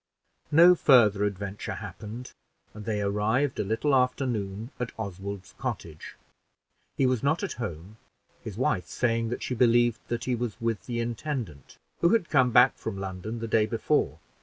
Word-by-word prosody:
No 170 +4 +8
further 110 - +5
adventure 100 0 -4
happened, 110 +4 -8 0.4
and 105 -1 -9
they 105 -2 -1
arrived 110 +7 0
a - - +1
little 110 +8 0
after 130 +1 +2
noon 110 0 -3
at 125 -1 -3
Oswald's 100 -2 -6
cottage. 100 - -5 0.8
He 135 - +3
was 130 -2 +1
not 150 +7 +1
at 200 - -2
home, 95 0 -6 0.5
his 105 -2 -7
wife 110 -7 0
saying 115 -2 0
that 120 - -4
she - - -2
believed 120 -1 +3
that 120 0 -3
he 130 - -1
was 120 -2 -3
with 115 -3 -2
the 120 -1 -2
intendant, 115 - -4 0.2
who 170 - +4
had 215 -7 +1
come 130 -4 +4
back 125 +2 +6
from 110 -3 -4
London 95 +3 -5
the 115 - -3
day 110 -1 +2
before. 115 -1 0
115 Hz, 165 wpm, -27 LUFS, 100-125 Hz, 0.8 s, No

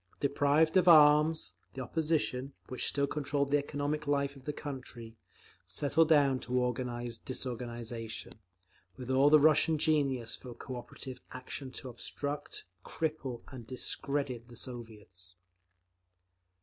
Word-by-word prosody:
Deprived 145 +4 +3
of 180 -1 +4
arms, 155 0 +6 0.2
the 130 - -4
opposition, 145 -2 -1 0.2
which 125 - -2
still 140 0 +1
controlled 140 -1 -1
the 145 - +5
economic 145 +1 -3
life 140 0 +1
of 135 -1 -15
the 150 - -1
country, 130 -6 -8 0.5
settled 145 - +3
down 140 -4 +5
to 125 +1 -2
organise 120 -1 -2
disorganisation, 120 -3 -5 0.6
with 125 0 -5
all 135 +2 +5
the 155 0 +8
Russian 155 +1 +4
genius 140 -7 +1
for 125 -2 -10
cooperative 125 0 -7
action—to 130 +1 -6
obstruct, 140 +4 -4 0.2
cripple 150 -6 -3
and 120 -4 -9
discredit 130 -1 -2
the 120 - -13
Soviets. 105 -8 -7
135 Hz, 120 wpm, -32 LUFS, 120-145 Hz, 0.6 s, the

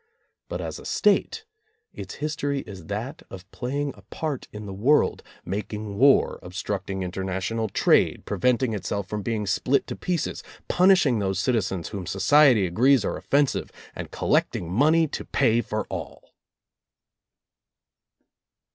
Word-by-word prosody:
But - - -4
as - - -5
a - - -12
State, 445 - +1 0.5
its - - -8
history 145 -2 -2
is 95 -8 -11
that 115 +9 -5
of 95 -1 -10
playing 140 +2 -3
a 100 - -16
part 140 +7 -5
in 105 0 -8
the 100 - -6
world, 125 +10 +2 0.2
making 105 +2 -4
war, 140 +1 +4
obstructing 95 +1 -4
interna 95 +1 -3
tional 110 +2 -2
trade, - - +3
preventing 125 -1 +1
itself 100 -1 -3
from 105 +2 -3
being 110 0 -2
split 125 +7 +1
to - - -6
pieces, 175 -3 -2 0.3
punishing 180 - +4
those 95 -2 -1
citizens 95 -4 -1
whom 95 -4 -6
society 120 +2 +5
agrees 120 +7 +3
are - - -1
offensive, 140 -1 0 0.2
and - - -6
collecting 85 -1 0
money 155 - +4
to - - -5
pay 120 -4 +2
for 105 -1 -3
all. - - -7
110 Hz, 140 wpm, -25 LUFS, 95-140 Hz, 0.5 s, society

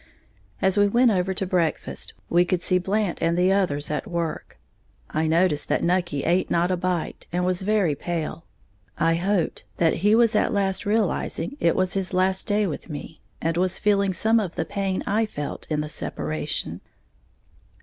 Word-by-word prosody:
As 190 +1 +3
we 205 - +5
went 240 +3 +4
over 190 -1 +1
to 190 +1 -1
breakfast, 175 -3 -1
we 175 +1 +4
could 180 0 -1
see 185 -1 +3
Blant 195 0 -1
and 165 +1 +1
the 185 +2 +4
others 150 -8 0
at 150 +7 -2
work. 170 -4 -4 0.5
I 155 +1 0
noticed 160 -2 +2
that - - +1
Nucky 175 -5 0
ate 180 +2 +1
not 175 +2 +2
a - - +2
bite, 180 -1 -3
and 180 +1 0
was 185 0 0
very 195 -5 +2
pale, 165 +2 -4 0.5
I 165 +1 +3
hoped 180 +1 0
that 165 -2 +2
he 205 +5 +4
was 230 -1 +4
at - - +2
last 195 -1 0
realizing 210 - 0
it 170 -10 +2
was 185 -1 +1
his 190 -1 -2
last 190 +2 +1
day 210 0 +2
with 165 -1 -5
me, 150 +1 -8 0.2
and 165 +1 0
was 185 +1 +1
feeling 200 -2 +2
some 220 +5 +3
of 190 -5 -3
the 165 - -1
pain 195 0 -2
I 220 +2 +1
felt 145 -8 -6
in 150 -1 0
the 150 - -4
separation. 75 - -3
180 Hz, 180 wpm, -24 LUFS, 165-200 Hz, 0.5 s, we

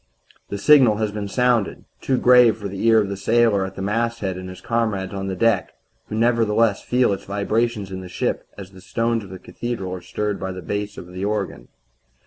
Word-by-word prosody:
The 100 - -3
signal 130 -1 +6
has 110 -1 -1
been 105 -1 -4
sounded 120 -1 +1 0.2
too 130 - +1
grave 125 -3 +6
for 105 -2 -5
the 100 +3 -2
ear 115 -1 +6
of 105 - 0
the 100 - -4
sailor 105 -1 +2
at 95 - -11
the 95 - -5
masthead 110 -2 -1
and 95 0 -7
his 95 - -9
comrades 110 -5 -1
on 95 0 -4
the 95 - -3
deck 105 -1 +1 0.3
who - - -5
nevertheless 115 -2 +2
feel 125 -4 +2
its 95 - -6
vibrations 105 +1 -1
in 95 0 -5
the 90 - -9
ship - - -2
as 95 -2 -9
the 95 -1 -14
stones 115 +3 -1
of 95 - -11
a 95 - -7
cathedral 100 -2 -5
are 90 - -6
stirred 105 +3 -3
by 95 -1 -4
the 90 -1 -8
bass 100 +4 -4
of - - -8
the 90 +1 -5
organ. 100 - -3
105 Hz, 215 wpm, -22 LUFS, 95-115 Hz, 0.3 s, signal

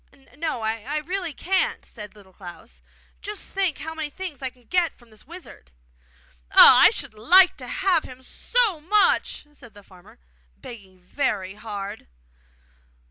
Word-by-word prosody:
'No, 300 -6 -4
I 225 +7 -3
really 350 +2 -4
can't,' 375 +6 -1
said 210 -2 -11
Little 195 -3 -18
Klans. 185 +5 -13 0.4
'Just 420 0 -8
think 380 -7 -1
how 320 0 -7
many 315 -2 -5
things 345 -4 -8
I 265 - -2
can 250 -1 -26
get 355 +5 0
from 240 -2 -22
this 215 +3 -16
wizard!' 340 - -13 0.8
'Ah! - - +9
I - - +8
should - - -7
like 355 - +5
to - - -9
have 380 -4 0
him 255 0 -13
so 440 - -1
much!' 405 -2 +1
said 240 -7 -17
the 205 - -15
farmer, 185 -2 -19 0.4
begging 195 -6 -13
very 195 -2 -3
hard. 205 -1 -8
260 Hz, 150 wpm, -23 LUFS, 210-355 Hz, 0.8 s, Ah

